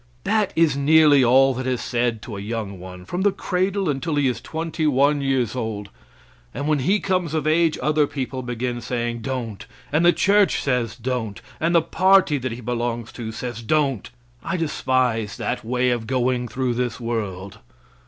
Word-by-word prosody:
That 210 0 +1
is 160 -4 +3
nearly 145 -1 +5
all 135 +2 +5
that 130 +1 -4
is 125 -2 0
said 120 -2 -1
to 110 - -7
a - - -5
young 105 -3 -4
one 90 0 -10
from 175 - -3
the 205 +1 +3
cradle 190 +1 -1
until 150 +2 -1
he 145 -2 +2
is 120 -2 -2
twenty 160 +3 -3
one 145 +1 +3
years 130 -4 0
old, 110 -4 -4 0.6
and 140 +4 -3
when 155 -2 +2
he 190 +10 +2
comes 180 -5 -1
of 155 -2 -1
age 160 +1 +2
other 150 -1 +2
people 130 -2 -4
begin 120 0 -3
saying 120 -1 -3
"Don't!" 120 -5 -5 0.2
And 155 +3 +2
the 175 - +7
church 200 +2 +3
says 125 -5 -1
"Don't!" 120 -4 -3 0.2
And 170 +2 +1
the 165 - +5
party 185 -5 +3
that 130 0 -3
he 120 +2 -6
belongs 120 0 -3
to 115 -2 -6
says 120 0 -6
"Don't!" 135 -2 0 0.3
I 185 - -2
despise 125 - 0
that 125 - -3
way 125 +2 +1
of 120 -2 -2
going 125 -1 0
through 125 +1 -1
this 120 -1 -2
world. 105 -5 -4
130 Hz, 185 wpm, -22 LUFS, 115-155 Hz, 0.6 s, the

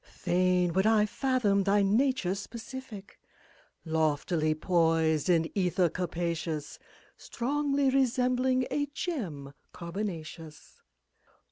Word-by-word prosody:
Fain 180 -1 0
would 190 +4 +2
I 220 -1 +4
fathom 230 -4 +1
thy 200 +1 +2
nature's 205 -3 +1
specific 225 -2 -9 0.7
Loftily 155 0 0
poised 160 -2 +1
in 165 -2 +2
ether 180 -2 +2
capacious. 170 -3 -3 0.4
Strongly 280 +1 0
resembling 255 0 +2
a 290 0 0
gem 190 - -5 0.2
carbonaceous. 170 -4 -7
190 Hz, 90 wpm, -29 LUFS, 165-250 Hz, 0.7 s, I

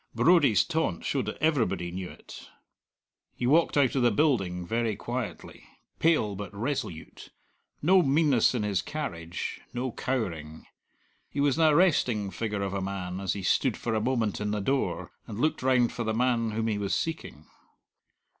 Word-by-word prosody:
Brodie's 160 - +5
taunt 160 - -1
showed - - -1
that - - -4
everybody 110 - +1
knew 90 0 -5
it. - - -12 0.9
He - - -3
walked 155 +4 +3
out 135 -4 +3
of 135 - +1
the 120 - +5
building 100 - +1
very 115 +2 -1
quietly, 120 0 -6 0.4
pale 155 -11 +2
but 100 -1 -6
resolute; 105 - -4 0.5
no 185 +4 +6
meanness 140 -5 +3
in 115 - 0
his 100 -3 0
carriage, 85 - -5
no 125 +1 -2
cowering. 85 -14 -4 0.6
He - - -5
was 145 +1 +2
an 160 - +5
arresting 125 - +2
figure 105 -2 -3
of 95 -1 -3
a 100 - -2
man 95 -1 -4
as 95 -2 -1
he 100 - -6
stood 125 +4 +1
for 115 - -3
a 110 - +1
moment 115 -4 0
in 105 - -1
the 105 0 -1
door 95 -7 -1 0.2
and 110 -2 -6
looked 155 +4 +1
round 125 -2 +3
for 120 - -3
the 110 -1 -1
man 120 -1 +1
whom 110 +1 -2
he 105 -2 -1
was 100 -1 -1
seeking. 160 - -4
115 Hz, 170 wpm, -28 LUFS, 100-135 Hz, 0.9 s, no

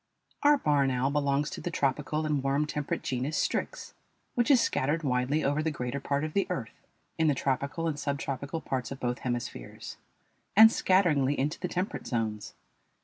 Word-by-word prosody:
Our 290 0 +6
barn 145 - +2
owl 130 +1 0
belongs 140 0 +1
to - - -6
the - - -3
tropical 150 0 -1
and 150 -2 0
warm 135 +2 +1
temperate 150 -1 -3
genus 130 +4 -2
Strix, - - -2 0.4
which 240 +2 +1
is 270 -4 +7
scattered 155 - 0
widely 130 +3 +1
over 145 +2 +1
the 160 - 0
greater 125 -2 -3
part 140 +1 -1
of 155 0 -3
the 200 - +1
earth 150 -11 -6 0.3
in 160 - +3
the 145 - +3
tropical 140 +6 -1
and 150 -2 -2
subtropical 140 +2 -3
parts 130 -4 -3
of 135 - -6
both 125 -1 -2
hemispheres, 120 - -5 0.6
and 220 +2 +9
scatteringly 150 -10 +2
into 145 +5 -1
the 180 - -2
temperate 180 +3 -3
zones. 110 -4 -3
145 Hz, 175 wpm, -29 LUFS, 130-160 Hz, 0.6 s, and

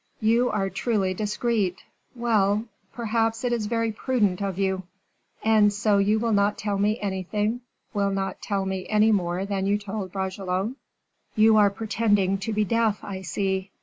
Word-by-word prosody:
"You 235 +3 +3
are 195 -2 -1
truly 195 -2 0
discreet 210 -2 -1 0.3
well! 215 -3 +1 0.3
perhaps 225 0 -1
it 245 -1 +1
is 220 -3 -1
very 230 0 0
prudent 210 -5 0
of 195 -2 -2
you." 190 -1 0 0.6
"And 215 -2 +5
so 205 0 +2
you 205 +2 +3
will 230 +1 0
not 205 0 +2
tell 205 -2 -2
me 210 +3 +1
anything, 205 +4 -2 0.3
will 200 -2 +1
not 195 0 -3
tell 195 -2 -1
me 190 -1 -3
any 215 +1 +4
more 180 -2 0
than 195 -1 -2
you 205 +1 +2
told 200 -2 -5
Bragelonne?" 190 +3 -2 0.6
"You 220 0 +5
are 205 -1 +6
pretending 205 -2 +1
to 220 +3 -3
be 210 0 +1
deaf, 225 0 +1
I 190 -2 -6
see. 190 +1 -2
205 Hz, 165 wpm, -25 LUFS, 195-220 Hz, 0.6 s, are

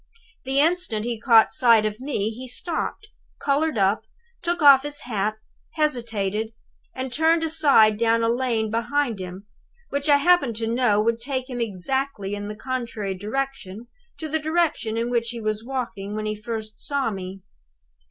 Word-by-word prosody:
The 270 +1 +1
instant 310 -9 +2
he 235 -2 -3
caught 230 -4 +5
sight 230 -2 +5
of 215 +1 -3
me 250 -6 -2
he 250 +3 -8
stopped, 340 - -4 0.3
colored 290 -1 +1
up, 200 +2 +2 0.4
took 345 0 -1
off 280 -2 +9
his 290 +1 -4
hat, 215 -3 -2 0.4
hesitated, 225 -8 -1 0.4
and 260 -1 -4
turned 320 +3 +3
aside 280 -10 +4
down 230 0 +3
a - - +2
lane 230 -2 0
behind 235 0 0
him, 185 +2 -7 0.4
which 280 +2 -2
I 285 - +7
happen 285 -6 +3
to 225 +1 -1
know 230 -2 +2
would 230 +2 +1
take 260 0 -3
him 245 -1 -3
exactly 225 +1 -2
in 205 0 -4
the 210 - -6
contrary 230 -5 -4
direction 220 +1 -5 0.3
to 315 - -5
the 315 +1 -1
direction 315 -8 0
in 235 +1 -1
which 235 -1 0
he 235 -1 -5
was 215 0 -2
walking 235 -6 -4
when 215 0 -3
he 215 - -1
first 215 0 -6
saw 280 -5 -1
me. 190 -1 -7
235 Hz, 165 wpm, -24 LUFS, 215-275 Hz, 0.4 s, off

